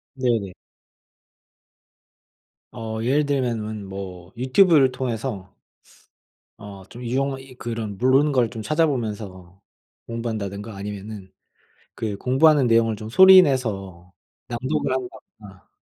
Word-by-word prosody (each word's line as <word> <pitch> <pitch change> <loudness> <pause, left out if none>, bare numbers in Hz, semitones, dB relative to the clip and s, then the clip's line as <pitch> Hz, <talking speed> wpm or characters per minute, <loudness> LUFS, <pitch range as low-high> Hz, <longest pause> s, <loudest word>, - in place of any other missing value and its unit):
네네. 115 -8 -1 2.2
어 110 -2 -5
예를 145 +5 +2
들면은 115 -7 -2
뭐 95 -2 -8
유튜브를 135 +1 +4
통해서 115 -6 -4 1.1
어 100 -2 -10
좀 120 +1 -10
유용하 135 +3 -1
이 135 -1 -13
그런 115 -4 -5
모르는 135 +4 +3
걸 125 -4 +2
좀 110 +1 -7
찾아보면서 105 - -2 0.5
공부한다든가 110 -3 -5
아니면은 100 -1 -8 0.6
그 105 -3 -4
공부하는 135 +4 +3
내용을 115 -2 +3
좀 110 +1 -8
소리 190 +9 +9
내서 100 - -2 0.4
낭독을 130 +4 -2
한다거나 110 -6 -8
115 Hz, 245 characters per minute, -23 LUFS, 100-130 Hz, 2.2 s, 소리